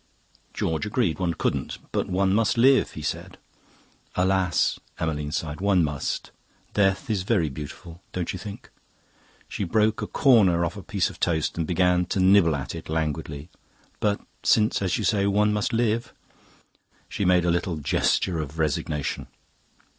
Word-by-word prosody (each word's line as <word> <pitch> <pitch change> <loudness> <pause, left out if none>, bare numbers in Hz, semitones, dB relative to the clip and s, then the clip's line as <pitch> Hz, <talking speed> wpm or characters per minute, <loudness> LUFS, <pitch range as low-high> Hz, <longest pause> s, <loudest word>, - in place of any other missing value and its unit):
"George 80 +6 -1
agreed; 105 -6 0
one 85 -2 0
couldn't. - - -2
'But - - -1
one 95 +1 +2
must 115 +2 +2
live,' 130 +3 +4
he 75 - -7
said. - - -4 0.8
"'Alas!' 90 -2 +1 0.2
Emmeline 75 -3 -2
sighed. 75 +1 -3
'One 95 -3 +3
must. 75 -2 -3 0.4
Death 95 -2 +2
is 105 -5 0
very 95 -5 +1
beautiful, 75 +5 -9
don't 90 -2 -3
you 95 - -6
think?' 100 +1 -9 0.8
She - - -4
broke 105 +4 +1
a - - -3
corner 95 -10 +4
off 85 +4 -4
a 100 - -7
piece - - -1
of - - -15
toast 80 -3 0
and 80 -2 -2
began 90 0 +2
to 95 - -1
nibble 95 -4 +5
at 65 -3 -5
it 80 -2 -8
languidly. 80 -1 -3 0.5
'But 105 -1 +1 0.2
since, 110 -1 +3
as 95 -3 0
you - - -3
say, 100 -3 +2
one 105 +1 +2
must 105 +2 0
live...' 115 0 0 0.9
She - - -3
made 90 -2 +3
a 85 - +3
little 85 -1 -1
gesture 80 +3 +1
of 75 0 -5
resignation. 75 -2 -2
90 Hz, 160 wpm, -25 LUFS, 80-100 Hz, 0.9 s, nibble